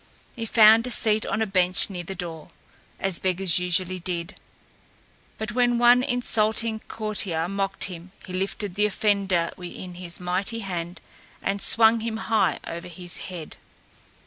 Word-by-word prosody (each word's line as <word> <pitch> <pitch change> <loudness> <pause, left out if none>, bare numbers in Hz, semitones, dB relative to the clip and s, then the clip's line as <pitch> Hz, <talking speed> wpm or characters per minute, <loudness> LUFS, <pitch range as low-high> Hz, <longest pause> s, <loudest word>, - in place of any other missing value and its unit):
He 230 -2 -5
found 225 +2 +6
a - - -3
seat 215 -3 +1
on 220 - 0
a - - 0
bench 185 -2 +3
near 185 -3 -6
the 190 +3 -7
door, 165 -4 -7 0.5
as 195 -3 +4
beggars 185 -2 +1
usually 180 +1 -1
did; 170 -1 -4 1.0
but 220 -1 -4
when 245 +1 +2
one 240 +1 +6
insulting 225 -3 0
courtier 200 -7 -2
mocked 195 0 -1
him 180 0 -2
he 185 - -9
lifted 195 +1 -3
the 210 +2 +2
offender 195 -5 0
in 180 0 -8
his 175 -1 -6
mighty 185 +6 -2
hand 175 -3 -5 0.4
and 200 0 -2
swung 225 0 +6
him 225 0 -3
high 225 -1 +1
over 170 +1 -7
his 175 0 -8
head. 170 -4 -9
195 Hz, 150 wpm, -24 LUFS, 180-220 Hz, 1.0 s, found